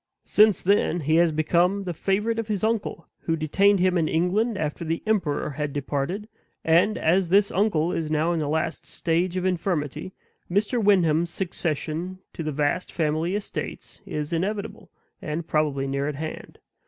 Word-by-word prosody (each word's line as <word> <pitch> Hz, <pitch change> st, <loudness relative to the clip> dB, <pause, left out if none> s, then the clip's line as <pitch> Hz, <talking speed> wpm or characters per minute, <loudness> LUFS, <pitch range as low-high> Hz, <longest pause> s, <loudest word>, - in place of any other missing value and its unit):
Since 210 Hz, -3 st, +4 dB
then 180 Hz, -3 st, +2 dB
he 155 Hz, +2 st, +2 dB
has 170 Hz, -1 st, +4 dB
become 175 Hz, +5 st, +2 dB
the 180 Hz, -2 st, -3 dB
favorite 210 Hz, +7 st, 0 dB
of 225 Hz, -, -3 dB
his 210 Hz, -3 st, -2 dB
uncle, 220 Hz, -7 st, -1 dB
who 165 Hz, -, -1 dB
detained 195 Hz, +6 st, +3 dB
him 180 Hz, -1 st, +3 dB
in 160 Hz, -, +1 dB
England 195 Hz, +8 st, +1 dB
after 155 Hz, 0 st, -3 dB
the 165 Hz, 0 st, -2 dB
emperor 180 Hz, -10 st, 0 dB
had 145 Hz, 0 st, -3 dB
departed 145 Hz, +8 st, -3 dB, 0.4 s
and, 170 Hz, +6 st, +4 dB
as 175 Hz, +2 st, +2 dB
this 200 Hz, +2 st, +4 dB
uncle 180 Hz, -5 st, +1 dB
is 165 Hz, -3 st, -2 dB
now 155 Hz, +2 st, +1 dB
in 165 Hz, -, -1 dB
the 150 Hz, -, -1 dB
last 160 Hz, +2 st, -1 dB
stage 175 Hz, +2 st, 0 dB
of 185 Hz, -, -1 dB
infirmity, 170 Hz, -3 st, -1 dB, 0.4 s
Mr. 210 Hz, +5 st, +1 dB
Wyndham's 170 Hz, -5 st, +3 dB
succession 170 Hz, 0 st, -3 dB, 0.2 s
to -, -, -6 dB
the 155 Hz, -1 st, -2 dB
vast 145 Hz, +5 st, -1 dB
family 160 Hz, +3 st, 0 dB
estates 205 Hz, -, -6 dB
is 150 Hz, +2 st, -3 dB
inevitable, 205 Hz, +5 st, -3 dB, 0.3 s
and 160 Hz, +2 st, -4 dB
probably 150 Hz, -4 st, 0 dB
near 140 Hz, +1 st, -1 dB
at 150 Hz, -, -3 dB
hand. 155 Hz, +2 st, -7 dB
170 Hz, 165 wpm, -25 LUFS, 155-195 Hz, 0.4 s, Since